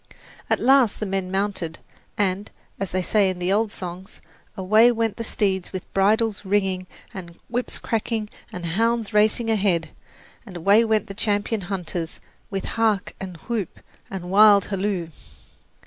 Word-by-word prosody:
At - - +2
last 260 -3 +4
the 215 - -2
men 190 -1 -2
mounted, 190 -4 -2 0.4
and, 195 0 0 0.3
as 195 -1 -2
they 185 0 -1
say 200 0 +3
in 185 - -3
the 180 +2 0
old 215 0 +1
songs, 185 +1 -8 0.4
away 215 +5 +5
went 225 -2 -1
the 230 - -3
steeds 190 -4 -1
with 185 -2 -7
bridles 210 +2 +2
ringing 190 -2 0 0.3
and 170 -3 -8
whips 245 +2 -2
cracking 225 -1 -2 0.2
and 180 -1 -6
hounds 225 +5 0
racing 215 +2 +3
ahead, 185 -7 +1 0.5
and 190 -6 -9
away 200 +6 +5
went 220 -2 +1
the 195 - -8
champion 205 +1 -1
hunters 175 -3 -4 0.3
"with 195 -2 -3
hark 220 -3 0
and 185 -3 -7
whoop 225 -7 -4 0.3
and 180 -2 -6
wild 205 0 +7
halloo!" 195 -4 -2
200 Hz, 150 wpm, -23 LUFS, 185-220 Hz, 0.5 s, wild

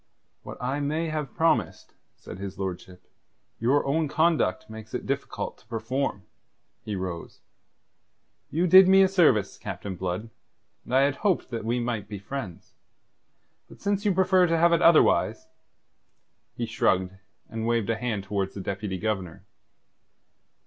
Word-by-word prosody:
"What - - -9
I 130 +3 -2
may 155 +3 -1
have 150 -4 -4
promised," 125 - 0 0.2
said 90 - -11
his 100 -1 -6
lordship, 95 -1 -6 0.5
"your 130 +6 +2
own 155 +3 +1
conduct 155 - +1
makes 110 0 -9
it - - -4
difficult - - -4
to - - -26
perform." 115 -2 -3 0.6
He 105 - -4
rose. 90 -3 -6 1.1
"You 170 +4 0
did 185 +1 +8
me 195 +1 +7
a - - +5
service, 130 - +2
Captain 95 -2 -6
Blood, 95 +5 -4 0.5
and 125 - -2
I 135 - +6
had 140 0 +1
hoped 195 -9 0
that 115 -2 -4
we 120 +2 0
might 120 -4 -3
be 105 - -5
friends. 100 -3 -7 1.0
But - - -15
since 200 0 -1
you 210 - +2
prefer 185 -1 +3
to 165 0 +1
have 170 +1 +4
it 170 - +2
otherwise...." 165 -2 +4 1.1
He - - -1
shrugged, 95 0 +1 0.3
and 115 0 -4
waved 115 -2 +1
a - - 0
hand 110 -3 -3
towards 95 -1 -3
the 100 - -5
Deputy 95 0 -4
Governor. 95 -4 -4
115 Hz, 150 wpm, -26 LUFS, 100-160 Hz, 1.1 s, did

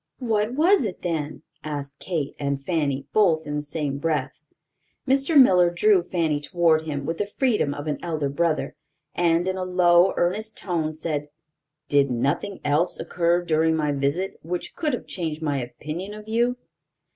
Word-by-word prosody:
"What 225 -1 0
was 350 +4 +4
it 200 -5 -5
then?" 155 -3 -3 0.2
asked 145 -2 -5
Kate 160 -6 -3
and 140 -1 -1
Fanny, 145 -6 -1
both 170 -7 +3
in 150 0 -3
the - - -1
same 145 -2 -3
breath. 155 0 -2 0.7
Mr. 275 +3 +4
Miller 180 -9 +6
drew 185 +2 +3
Fanny 165 -4 -1
toward 160 0 +2
him 145 -3 -4
with 165 +2 -3
the 205 - -1
freedom 210 - 0
of 145 +1 -6
an 150 -2 -2
elder 155 -4 -2
brother, 155 +3 -1 0.4
and, 170 +1 +2
in 190 0 -1
a 185 - -2
low, 180 0 +4
earnest 210 +5 -1
tone, 160 -4 -2
said: 150 -2 -3 0.6
"Did 140 -1 +3
nothing 140 +11 -1
else 150 +5 +1
occur 175 0 +1
during 160 0 +2
my 150 -2 0
visit, 140 +7 -1
which 175 +3 -5
could 305 -4 -1
have 245 - -3
changed 160 -3 -4
my 145 -3 0
opinion 155 +11 -6
of 215 0 -11
you?" 240 +3 +1
165 Hz, 170 wpm, -24 LUFS, 150-190 Hz, 0.7 s, Miller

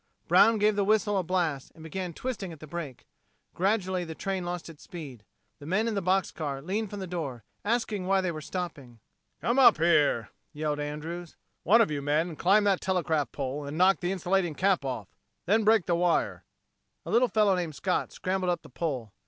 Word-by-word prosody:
Brown 225 0 +6
gave 210 0 +3
the 200 - +2
whistle 205 0 +2
a 190 - +2
blast, 165 -6 -1
and 160 - -13
began 180 +3 -4
twisting 200 -1 -5
at 160 - -11
the 155 - -9
brake. 150 -4 -7 0.5
Gradually 190 -1 0
the 160 -2 -7
train 190 0 -3
lost 175 0 -4
its 165 -3 -12
speed. 140 - -9 0.4
The 145 - -10
men 210 +7 +1
in 230 - -1
the 200 - -1
box 190 +1 +1
car 145 -4 -4
leaned 200 +8 -2
from 205 0 -6
the - - -3
door, 150 - -5 0.2
asking 210 -4 -1
why 195 0 +3
they 185 -2 -1
were 155 -2 -6
stopping. 145 -9 -6 0.4
"Come 240 +3 +1
up 260 - +7
here," 150 -8 +3 0.2
yelled 150 -1 -2
Andrews. 155 +4 -5 0.3
"One 225 +6 +5
of 215 - +2
you 145 -1 -2
men 155 +4 0
climb 200 +7 +4
that 200 -2 +2
telegraph 165 -6 0
pole 140 +1 -4
and 145 +2 -5
knock 185 +2 +4
the 175 +1 -1
insulating 185 -3 0
cap 190 -2 +2
off. 125 -7 -4 0.4
Then 215 +4 +3
break 220 -3 +4
the 175 - +1
wire." 170 0 +1 0.6
A - - -5
little 245 +2 +4
fellow 210 -4 +3
named 170 -4 -3
Scott 180 +5 -1
scrambled 185 0 -2
up 175 - -1
the - - -13
pole. 130 - -4
175 Hz, 200 wpm, -28 LUFS, 150-195 Hz, 0.6 s, up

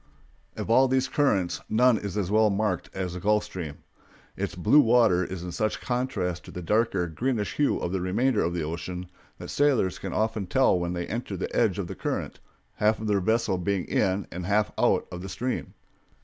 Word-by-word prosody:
Of - - -3
all 130 +3 +6
these 130 0 +1
currents 100 -12 +1
none 120 0 +4
is 100 -1 -5
as 100 -2 -1
well 110 0 +4
marked 100 -2 -1
as 95 -2 -4
the 90 - -5
Gulf 105 +3 +2
Stream. 80 -6 -7 0.5
Its - - -3
blue 105 +11 +5
water 115 -8 +4
is 90 -1 -5
in 90 - -5
such 110 +5 -1
contrast 120 -9 -2
to - - -11
the 90 - -7
darker, 105 -1 +1
greenish 105 - -2
hue 145 - +2
of 90 - -3
the 95 -1 -1
remainder 105 +6 +1
of 85 +1 -1
the 85 - -1
ocean 90 +3 -5 0.3
that - - -8
sailors 135 -10 +2
can - - -5
often 110 -3 -1
tell 130 -4 +3
when 85 0 -2
they 85 -1 -3
enter 110 -4 -4
the 95 - -4
edge 105 -6 +2
of 100 - -2
the 90 - -6
current, - - -4 0.4
half 110 +1 +3
their 105 -2 0
vessel 110 -2 +1
being 95 0 -1
in 95 +1 0
and 90 0 -5
half 105 +1 +2
out - - +2
of 90 - -6
the 95 - -7
stream. 125 +6 -3
100 Hz, 205 wpm, -26 LUFS, 90-115 Hz, 0.5 s, all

